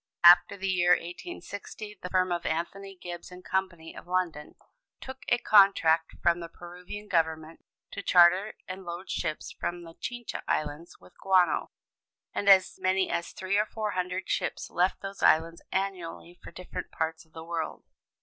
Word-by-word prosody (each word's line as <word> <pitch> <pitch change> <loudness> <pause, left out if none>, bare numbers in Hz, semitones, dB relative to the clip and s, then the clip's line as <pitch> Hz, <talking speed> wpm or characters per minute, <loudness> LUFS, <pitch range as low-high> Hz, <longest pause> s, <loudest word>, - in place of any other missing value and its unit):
About 175 +1 +11
the 195 -1 -5
year 180 -1 +4
1860, 205 - -6
the 180 - -5
firm 185 0 +2
of 175 0 -1
Anthony 195 +5 -3
Gibbs 175 0 -8
& - - -19
Co., 190 0 0 0.3
of - - -11
London, 175 -4 -2 0.4
took 260 0 -8
a 240 - +4
contract 195 -8 +4
from 170 0 +3
the 170 -1 -7
Peruvian 180 +5 -10
Government 160 -2 -1 0.3
to - - -5
charter 180 +4 +5
and 190 +1 -7
load 175 +2 -6
ships 155 - -3
from 175 0 -4
the 165 -1 -11
Chincha 240 +5 -6
Islands 155 +2 -2
with - - -18
guano, 185 -2 +3 0.6
and 200 - +1
as 190 -2 +5
many 185 0 +1
as 170 - -2
three 190 +2 -1
or 210 - +1
four 215 -1 -3
hundred 185 0 -3
ships - - -2
left 180 +2 +1
those 195 0 -7
islands 165 +1 +3
annually 180 -2 -4
for - - -9
different 180 - -7
parts 160 0 -3
of 160 -1 -30
the 160 - -8
world. 165 -1 -4
180 Hz, 165 wpm, -28 LUFS, 170-195 Hz, 0.6 s, About